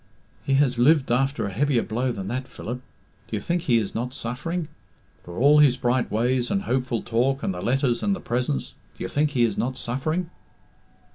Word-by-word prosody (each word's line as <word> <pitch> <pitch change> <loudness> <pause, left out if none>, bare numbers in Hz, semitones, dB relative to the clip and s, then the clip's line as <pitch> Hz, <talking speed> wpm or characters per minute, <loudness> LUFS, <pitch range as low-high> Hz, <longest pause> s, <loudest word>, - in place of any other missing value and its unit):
"He 135 - +1
has 135 -3 +2
lived 140 +1 +4
after 135 0 +1
a 100 - -3
heavier 130 +4 +1
blow 125 +3 -1
than 95 -4 -5
that, 130 +4 -3
Philip. 125 +1 -6 0.5
Do - - -4
you - - -1
think 175 0 -1
he 120 -7 +3
is 105 -4 -1
not 125 +3 -3
suffering? 150 +7 -3 0.6
For 85 0 -9
all 145 +4 +6
his 140 -4 +5
bright 125 0 +1
ways 120 +3 +1
and 200 0 0
hopeful 130 - -1
talk 130 +4 0
and 95 - 0
the 90 - -6
letters 125 0 +1
and 200 -1 +1
the - - -7
presents, 120 - -2 0.3
do - - -5
you - - -2
think 150 +1 +1
he 130 -5 +1
is 110 -4 +1
not 130 +1 -1
suffering?" 155 +9 -2
125 Hz, 205 wpm, -24 LUFS, 120-145 Hz, 0.6 s, all